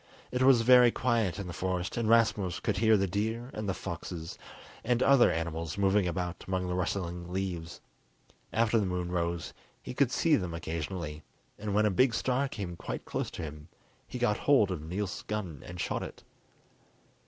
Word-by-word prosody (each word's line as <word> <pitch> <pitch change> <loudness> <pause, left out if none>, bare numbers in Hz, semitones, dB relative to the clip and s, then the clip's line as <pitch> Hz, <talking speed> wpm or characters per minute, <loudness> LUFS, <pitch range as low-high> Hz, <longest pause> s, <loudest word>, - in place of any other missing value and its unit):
It 125 - -1
was 130 -2 +6
very 125 0 +8
quiet 115 -6 0
in 100 - -4
the 90 - -6
forest, 90 0 -2
and 115 -2 0
Rasmus 105 -6 +3
could - - -1
hear 110 +1 +5
the 95 - +2
deer 110 +6 -2
and 110 -2 -3
foxes 85 -2 -6 0.5
and 120 +1 +2
other 135 -8 +6
animals 80 +1 -3
moving 100 -1 +3
about 90 0 -3
among 95 -1 -1
the 90 - -2
rustling 90 -1 -3
leaves. 90 -3 -4 0.7
After 115 0 +3
the 100 - 0
moon 90 -1 -2
rose 85 -1 -2 0.3
he - - -7
could 135 -1 +2
see 155 +2 +3
them 90 -4 -3
occasionally, 80 -1 -4 0.4
and 105 -1 -3
when 105 +1 +4
a 105 - +3
big 125 +5 +3
stag 130 +2 0
came 95 -7 -5
quite - - -6
close - - -3
to - - -7
him 75 -1 -8 0.4
he - - -6
got 105 -4 +1
hold 125 -9 +4
of 90 -5 -3
Niels' 90 +4 -4
gun 95 -10 -4
and 85 +1 -8
shot - - -1
it. - - -8
95 Hz, 180 wpm, -30 LUFS, 85-115 Hz, 0.7 s, very